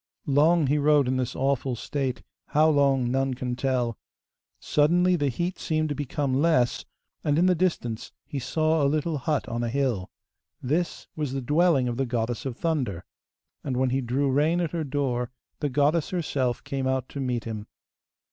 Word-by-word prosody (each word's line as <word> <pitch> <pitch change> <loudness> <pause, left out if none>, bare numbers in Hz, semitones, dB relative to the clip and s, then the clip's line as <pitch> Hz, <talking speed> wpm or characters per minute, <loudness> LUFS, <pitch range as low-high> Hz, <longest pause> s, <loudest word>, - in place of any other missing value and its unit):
Long 155 +3 +4
he 145 +3 +2
rode 145 -2 +4
in 130 +1 +1
this 125 -2 -2
awful 135 -1 0
state, 130 +1 -3 0.2
how 155 +2 +4
long 135 -4 +2
none 135 0 0
can 125 -1 -3
tell. 125 -3 -1 0.6
Suddenly 175 +5 +3
the 145 -4 0
heat 175 +9 -3
seemed 155 -1 0
to - - 0
become 145 -1 -2
less, 140 -7 +2 0.4
and, 145 0 +2
in 175 - +4
the 185 - +5
distance, 155 -11 -1
he 145 - -4
saw 155 +4 +1
a 140 - +3
little 155 +1 -1
hut 150 +2 -1
on 120 +1 -2
a 120 - -1
hill. 120 -8 -1 0.5
This 155 +7 -1
was 150 -4 -2
the 135 - -1
dwelling 150 -1 +3
of 120 -1 -2
the 135 -1 0
Goddess 120 +1 -2
of 125 -2 -5
Thunder, 130 - -1 0.6
and 130 -3 -2
when 130 0 +2
he 135 +1 +1
drew 130 +3 0
rein 155 +6 +2
at 170 -3 -1
her 165 -2 -2
door 130 -4 -1 0.3
the 150 - 0
goddess 145 +4 +2
herself 140 -9 -1
came 135 -1 -2
out 130 -1 0
to 140 - -6
meet 125 -3 -1
him. 110 -2 -6
140 Hz, 185 wpm, -26 LUFS, 125-155 Hz, 0.6 s, the